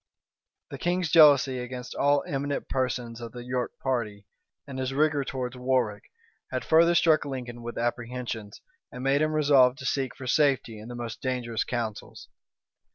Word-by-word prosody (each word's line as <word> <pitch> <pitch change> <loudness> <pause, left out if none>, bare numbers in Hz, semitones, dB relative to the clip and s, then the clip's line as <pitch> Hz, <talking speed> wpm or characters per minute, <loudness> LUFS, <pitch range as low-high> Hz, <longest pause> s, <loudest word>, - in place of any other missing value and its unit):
The - - -7
king's 175 -2 0
jealousy 140 -5 +6
against 125 0 -6
all 145 0 +2
eminent 140 0 -3
persons 125 -3 -2
of 115 -1 -8
the 120 -1 -8
York 125 0 -3
party, 110 -6 -2 0.4
and 135 -1 -7
his 130 +1 -2
rigor 150 -1 +2
towards 130 -2 -4
Warwick, 125 -4 0 0.4
had - - -3
further 170 +2 +5
struck 160 -3 +4
Lincoln 125 -4 -6
with 120 0 -7
apprehensions, 120 -2 -4 0.3
and 125 - -7
made 135 +2 +2
him 155 0 +1
resolve 140 -4 +5
to 130 - -10
seek 135 -1 -1
for 130 - -9
safety 130 -5 +1
in 110 - -10
the 120 - -7
most 120 -2 -6
dangerous 125 -3 -2
counsels. 115 -4 -5
130 Hz, 160 wpm, -27 LUFS, 120-140 Hz, 0.4 s, jealousy